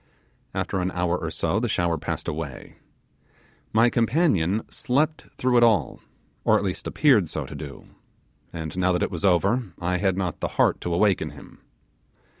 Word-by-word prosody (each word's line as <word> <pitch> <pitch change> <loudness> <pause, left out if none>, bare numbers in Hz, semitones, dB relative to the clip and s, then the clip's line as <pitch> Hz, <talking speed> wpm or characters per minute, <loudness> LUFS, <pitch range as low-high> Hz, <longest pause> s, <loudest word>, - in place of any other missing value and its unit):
After 95 - -1
an 90 0 0
hour 90 -1 0
or 80 -2 -3
so 95 +5 0
the 120 0 -1
shower 85 -4 +1
passed 80 - -4
away. 75 -4 -6 0.9
My 115 +2 +4
companion 115 - +2
slept 150 +5 -1
through 125 -1 +2
it 120 - +6
all, 105 - +2 0.4
or - - +4
at - - -2
least - - -3
appeared 120 - +3
so 75 -3 -3
to - - -9
do; 70 -4 -8 0.7
and 80 -2 -6
now 95 0 +3
that 90 - 0
it - - -1
was 85 - -4
over 100 +3 +2
I 90 +1 0
had 95 0 +1
not 90 -4 -2
the - - -1
heart - - +3
to 85 - -3
awaken 100 +1 +2
him. - - -14
95 Hz, 175 wpm, -25 LUFS, 85-115 Hz, 0.9 s, it